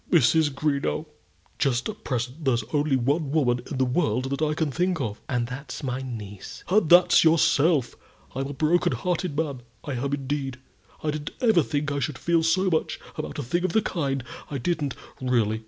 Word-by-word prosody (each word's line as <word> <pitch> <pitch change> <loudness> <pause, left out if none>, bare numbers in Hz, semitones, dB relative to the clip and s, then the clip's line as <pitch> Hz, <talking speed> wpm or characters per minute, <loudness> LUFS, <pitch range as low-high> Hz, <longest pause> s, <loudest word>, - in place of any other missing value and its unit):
"Mrs. 155 0 +4
Greenow, 140 +2 -1 0.5
just 130 -3 +1
at 215 -1 -7
present 125 +4 -3
there's 120 -5 +2
only 145 -1 +2
one 140 +4 +1
woman 125 -5 +2
in 140 - -4
the 130 - +3
world 130 -2 0
that 140 - -2
I 155 -1 +1
can 155 -2 0
think 180 +3 0
of." 110 -6 -3
"And 120 -2 0
that's 130 +4 -7
my 130 0 -2
niece." 105 -6 -8
"And 190 -4 +3
that's 175 +1 +7
yourself. 160 -4 +3 0.4
I'm 135 +1 -2
a 140 - -5
broken 170 +4 +2
hearted 180 -4 -2
man, 145 -5 -2 0.2
I 145 - -5
am, 135 +2 -2
indeed. 140 -1 -2 0.5
I 155 - +1
didn't 150 -1 -4
ever 220 -8 +4
think 145 0 -1
I 140 - -1
should 140 -1 -2
feel 170 +6 +2
so 175 +4 +2
much 160 - 0 0.2
about - - -5
a - - -2
thing 170 +9 -1
of 185 - 0
the 220 - +4
kind 140 -9 -1 0.3
I 145 - -3
didn't, 145 -1 -1 0.3
really. 115 -4 +1
145 Hz, 190 wpm, -25 LUFS, 130-160 Hz, 0.5 s, that's